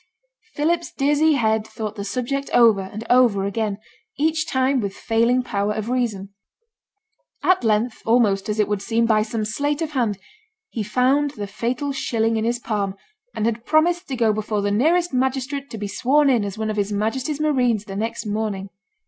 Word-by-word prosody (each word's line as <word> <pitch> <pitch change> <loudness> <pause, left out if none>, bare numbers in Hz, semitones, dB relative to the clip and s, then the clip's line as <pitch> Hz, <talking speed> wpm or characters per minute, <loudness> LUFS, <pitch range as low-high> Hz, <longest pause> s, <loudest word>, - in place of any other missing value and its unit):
Philip's 335 +3 0
dizzy 295 +3 +2
head 220 -5 +1
thought 215 -2 -5
the 200 - -5
subject 255 +6 -3
over 225 -5 +6
and 205 +4 -7
over 235 -6 +4
again, 205 0 -2 0.4
each 315 +2 +1
time 260 0 +1
with 200 -2 -4
failing 235 +3 +1
power 210 -4 -1
of 215 +1 -4
reason. 210 -6 -2 1.1
At 370 -7 +3
length, 220 +1 +1
almost, 220 -4 +2
as 210 +1 -2
it 210 - +3
would 205 -1 -1
seem, 230 +2 +1
by 220 -2 +3
some 215 0 -2
sleight 285 +7 -1
of 320 -2 -3
hand, 235 -8 0 0.5
he 225 - -3
found 260 +7 +1
the 205 - -3
fatal 245 +8 -3
shilling 230 -4 0
in 220 0 0
his 240 +1 0
palm, 205 -5 -2 0.4
and 215 - -1
had 230 0 -1
promised 345 +5 +2
to 270 - -3
go 225 -3 +2
before 210 -1 -2
the 205 - 0
nearest 330 +10 +2
magistrate 265 +2 -1
to 225 - -7
be 205 -1 -4
sworn 275 +7 +3
in 235 -5 +2
as 200 0 -5
one 220 0 -2
of 210 - -5
his 205 0 0
Majesty's 255 +8 -1
marines 250 -8 +1
the 195 - -7
next 225 +3 -3
morning. 205 -2 -3
230 Hz, 185 wpm, -22 LUFS, 210-270 Hz, 1.1 s, over